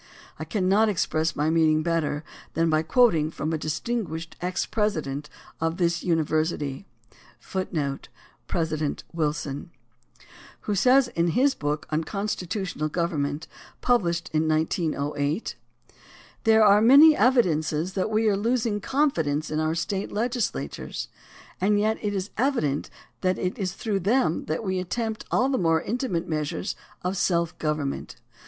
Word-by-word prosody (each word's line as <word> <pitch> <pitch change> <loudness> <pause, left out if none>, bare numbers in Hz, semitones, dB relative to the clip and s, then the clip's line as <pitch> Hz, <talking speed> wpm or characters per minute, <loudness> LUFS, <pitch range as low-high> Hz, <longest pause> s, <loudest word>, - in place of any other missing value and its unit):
I - - -4
cannot 210 +1 +2
express 165 -4 0
my 150 +2 +1
meaning 155 -1 +3
better 165 -3 -1 0.3
than 165 +1 +2
by 155 0 +3
quoting 165 - +3
from 160 0 -3
a - - +1
distinguished 165 +1 -3
ex 180 +1 -1
president 155 -9 -2 0.3
of 165 +1 -1
this 170 -2 +1
university,^ 155 -2 0 0.6
who 190 - -4
says 140 -4 -3 0.2
* 120 0 -35
President 155 -3 -2
Wilson. 150 -3 -1
AND 160 - -9
THE 120 -4 -30
RECALL - - -24 0.3
OF - - -26
JUDGES - - +1 0.3
91 170 - +2
in - - +1
his 270 +2 +3
book 150 +1 -2
on 155 +1 +1
Constitutional 190 -5 -3
Government, 150 -3 -2 0.3
published 175 -8 +1
in 155 0 +2
1908: 155 0 -1 0.9
There 220 0 +6
are 205 0 +6
many 285 +7 +8
evidences 180 - +2
that 190 +2 -1
we 220 +1 +2
are 205 - +3
losing 225 0 0
confidence 160 - 0
in 155 - 0
our 155 +1 0
State 190 +4 -2
legislatures, 235 +2 -3 0.5
and 205 +2 +3
yet 220 +1 +1
it 205 -1 -2
is 195 +1 -3
evident 230 - 0 0.3
that 185 -1 +1
it 185 +3 -3
is 185 -3 -2
through 210 -4 -2
them 195 -3 +1
that 155 +7 -2
we 190 -2 -1
attempt 220 +4 -3
all 255 - +2
the 270 -1 0
more 165 -2 +3
intimate 200 -3 -2
measures 155 -2 -2 0.3
of 180 +2 -1
self 170 -2 +1
government. 150 -3 -2
170 Hz, 150 wpm, -25 LUFS, 155-210 Hz, 0.9 s, many